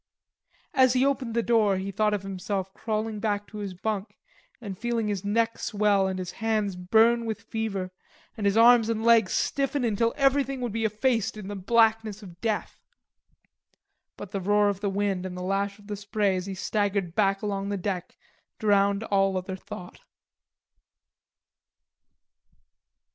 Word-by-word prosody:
As 260 -1 +5
he 255 +1 +3
opened 265 -4 -1
the 235 - +2
door 215 -5 +3
he 195 +1 -4
thought 210 +2 +1
of 200 - -5
himself 195 0 -4
crawling 215 0 -3
back 205 -1 -1
to 210 - -9
his 195 -3 -5
bunk 205 +1 -4 0.4
and 205 -5 -6
feeling 230 +1 -1
his 200 -2 -2
neck 225 +3 0
swell 205 -2 +2
and 190 -1 -3
his 180 -1 -4
hands 215 -3 -1
burn 225 +6 +3
with 225 -1 -4
fever 200 -5 -3 0.4
and 210 -3 -1
his 200 +2 +2
arms 230 -1 +6
and 225 -1 -1
legs 230 -4 +5
stiffen 275 -1 0
until 230 +1 +1
everything 275 -1 +2
would 245 -2 -2
be 225 +1 -1
effaced 220 0 0
in 205 -2 -7
the 205 - -4
blackness 220 +1 +2
of 175 -3 -13
death. 220 -2 -2 1.4
But 205 - -8
the 195 - -3
roar 205 +2 +3
of 200 -2 -3
the 200 0 -1
wind 195 -2 -1
and 185 -1 -6
the 180 - -5
lash 195 +1 -1
of 205 - -18
the 205 0 -4
spray 205 -1 0
as 185 +1 -4
he 195 - -4
staggered 200 -2 -1
back 195 0 +1
along 200 -1 -2
the 200 - -1
deck 185 -1 -4 0.4
drowned 200 -1 +2
all 195 -3 +1
other 185 +1 -4
thought. 180 -1 -10
205 Hz, 165 wpm, -26 LUFS, 195-225 Hz, 1.4 s, arms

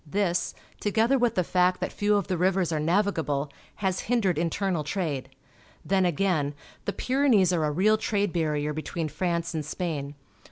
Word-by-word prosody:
This, 180 +1 0 0.2
together 225 +5 +2
with 240 -2 +2
the 185 - +2
fact 180 +1 +2
that - - -3
few 205 0 +2
of 200 -3 +1
the 185 - -1
rivers 180 0 +1
are 155 - 0
navigable, 155 -5 0 0.3
has 185 -1 +1
hindered 215 -8 +2
internal 170 0 0
trade. 150 -4 -3 0.6
Then 190 -1 +3
again, 165 -5 0 0.3
the 200 - -1
Pyrenees 250 -9 +3
are 160 -3 +1
a 150 - 0
real 205 +8 +3
trade 205 -3 0
barrier 150 -3 0
between 155 +1 -3
France 170 0 -1
and 155 -2 -2
Spain. 150 -3 -4
180 Hz, 165 wpm, -27 LUFS, 155-200 Hz, 0.6 s, Then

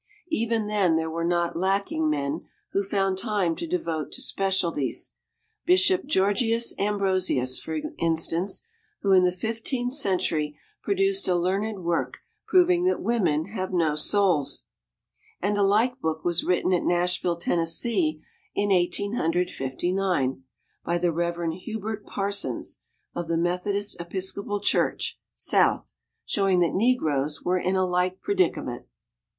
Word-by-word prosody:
Even 230 -5 0
then 200 -5 +2
there 160 0 -1
were 165 +1 -2
not 170 0 0
lacking 190 -3 0
men 145 +1 -2 0.2
who 200 - +1
found 195 -1 0
time 200 -6 0
to 335 - -5
devote 165 - -2
to - - -5
specialties: 185 -8 -1 0.6
Bishop 185 +2 +4
Georgius 230 0 +2
Ambrosius, 185 -10 +1
for 160 0 -4 0.2
instance, 165 - 0 0.4
who 195 - +2
in 185 -1 +6
the 180 - +3
Fifteenth 230 +6 -2
Century 170 - +1 0.2
produced 390 0 +1
a 180 - +3
learned 195 +3 -1
work 170 0 -1 0.3
proving 360 -1 +4
that 370 - +2
women 175 -10 +1
have 190 -3 -4
no 165 -4 +1
souls. 175 -2 +1 0.7
And 205 +2 0
a 205 - +1
like 215 +6 +3
book 160 -1 -2
was 175 -1 +1
written 180 +1 +1
at 175 - +2
Nashville, 175 0 +1
Tennessee, 165 -1 +1 0.3
in 205 0 +1
Eighteen 195 +3 +1
Hundred 180 -4 0
Fifty 135 +7 -3
nine, 180 -10 0 0.4
by 170 - 0
the 175 0 +1
Reverend 170 0 -1
Hubert 215 +3 -5
Parsons 200 0 -2 0.3
of 175 -1 -4
the 165 0 0
Methodist 180 +3 -1
Episcopal 190 +3 -3
Church - - 0 0.2
(South), - - +2 0.3
showing 195 -3 +2
that 170 - +2
negroes 155 - +1
were 180 +1 +1
in 185 +2 0
a 185 0 +2
like 180 +1 0
predicament. 180 -10 -1
185 Hz, 135 wpm, -26 LUFS, 170-205 Hz, 0.7 s, in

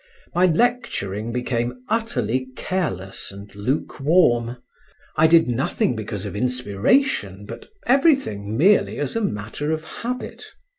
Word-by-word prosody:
My 180 +1 +4
lecturing 160 - 0
became 125 0 -2
utterly 130 - -1
careless 110 - -3
and 100 +1 -11
lukewarm; 125 - +1 0.6
I 160 - +5
did 165 -2 +5
nothing 125 0 0
because 105 -2 -5
of 100 - -5
inspiration, 105 - +1
but - - -9 0.2
everything 250 - +2
merely 195 +9 +4
as 145 +5 -2
a 230 - 0
matter 110 - -2
of 160 0 -2
habit. 245 +9 -6
125 Hz, 115 wpm, -22 LUFS, -, 0.6 s, I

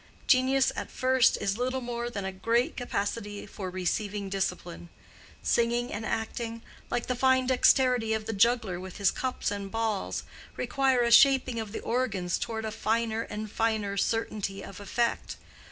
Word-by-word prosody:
Genius 265 0 +4
at - - -4
first 260 0 +3
is 200 +3 -1
little 255 +1 0
more 240 -1 -4
than 200 -5 -5
a 190 - -2
great 230 +6 0
capacity 205 -3 -3
for 195 -2 -6
receiving 195 +2 -2
discipline. 180 -3 -3 0.5
Singing 240 +1 +1
and 205 - -4
acting, 225 +1 -3 0.3
like 240 - -1
the 250 - -1
fine 260 +1 +3
dexterity 250 -2 +3
of 220 -1 -2
the 225 - -3
juggler 220 -3 +2
with 185 0 -8
his 200 - +3
cups 255 -5 -2
and 200 -1 -4
balls, 220 -2 -2 0.3
require 265 -2 +2
a 235 - +1
shaping 260 -1 +6
of 220 -2 -5
the - - -5
organs 205 -8 -1
toward 220 -1 -3
a 220 - -3
finer 225 +1 0
and 215 -1 -6
finer 220 -3 0
certainty 205 -2 -1
of 195 - -9
effect. 235 +4 -1
225 Hz, 160 wpm, -28 LUFS, 200-245 Hz, 0.5 s, shaping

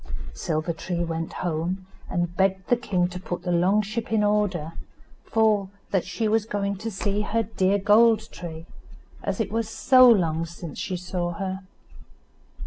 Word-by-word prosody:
Silver 160 -1 -2
tree, 175 +1 -3
went 165 -1 -3
home, 175 +3 -2 0.2
and 175 -1 -1
begged 190 0 +1
the 245 - +5
king 185 -7 0
to 180 0 -6
put 180 -1 -5
the 180 - -1
long 185 +5 +3
ship 220 +3 -4
in 220 -1 +3
order, 205 -6 0 0.5
for 215 -3 +2 0.2
that 190 -3 +1
she 220 +4 -2
was 220 0 +2
going 200 -2 -1
to 220 +4 -4
see 205 0 -1
her 225 +2 0
dear 200 -2 +1
Gold 220 +2 +4
tree, 165 -2 -8 0.6
as - - -3
it 220 - -1
was 225 0 -1
so 255 +2 +6
long 165 -7 +3
since 170 -1 -8
she 185 - -2
saw 175 -1 -3
her. 190 +1 -3
190 Hz, 165 wpm, -25 LUFS, 175-215 Hz, 0.6 s, so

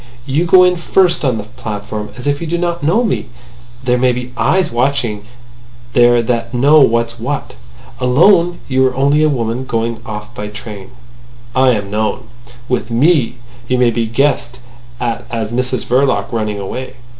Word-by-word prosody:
You 145 +5 0
go 180 +2 +6
in 180 0 +3
first 175 0 +2
on 130 -5 +1
the 105 - -4
platform, 110 -2 -6
as 125 - -8
if 145 +1 0
you 165 - -4
did 170 +2 -1
not 170 -1 -2
know 180 +11 +2
me. 225 - -1 0.6
There 125 -1 +1
may 125 0 +3
be 125 0 -5
eyes 185 +1 +1
watching 120 -4 -1 0.7
there 120 -1 +5
that 115 0 -2
know 145 +5 +5
what's 115 -2 +1
what. 140 +5 -4 0.5
Alone 170 +7 +4
you 130 -1 +2
are 130 - -3
only 140 +3 +2
a 155 - +4
woman 120 -2 -2
going 115 -2 -2
off 105 0 -7
by 105 -3 -6
train. 105 0 -9 0.7
I 130 0 +4
am 100 -3 -3
known. 110 +3 -2 0.4
With 125 -2 -1
me, 130 +1 +2 0.3
you 125 - +1
may 125 -1 +3
be 115 -1 -1
guessed 125 0 0 0.4
at 120 -2 -2
as 115 -2 -3
Mrs 125 0 -1
Verloc 130 0 +1
running 110 -3 -2
away. 130 +7 -6
125 Hz, 170 wpm, -16 LUFS, 115-140 Hz, 0.7 s, go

